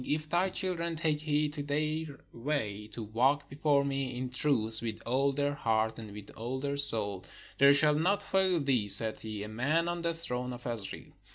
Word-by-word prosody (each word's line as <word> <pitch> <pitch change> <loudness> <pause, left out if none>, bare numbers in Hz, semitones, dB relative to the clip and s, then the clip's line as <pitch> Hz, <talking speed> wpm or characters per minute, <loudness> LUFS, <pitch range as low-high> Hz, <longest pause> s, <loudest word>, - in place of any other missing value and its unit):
If 155 +3 -2
thy 180 +3 +1
children 175 -3 -2
take 155 -2 -1
heed 150 -1 0
to 150 - -5
their 150 +1 -3
way, 110 -5 -3
to 115 +1 -7
walk 130 +7 +1
before 140 0 +1
me 135 -2 -3
in 125 0 -4
truth 115 -5 +1
with 110 -2 -4
all 135 +4 +1
their 145 +1 -1
heart 110 -4 -1
and 110 -2 -9
with 105 -1 -10
all 120 +4 -5
their 140 +1 -3
soul, 105 -9 +2 0.4
there 140 0 +7
shall 150 +1 +6
not 190 +7 +1
fail 190 -3 +1
thee 130 -7 0
(said 110 +2 +5
he) 110 -2 -6
a - - -6
man 140 +10 0
on 175 0 -3
the 170 0 -1
throne 125 -6 -3
of 120 0 -10
Israel." 115 -5 -5
140 Hz, 195 wpm, -30 LUFS, 115-155 Hz, 0.4 s, there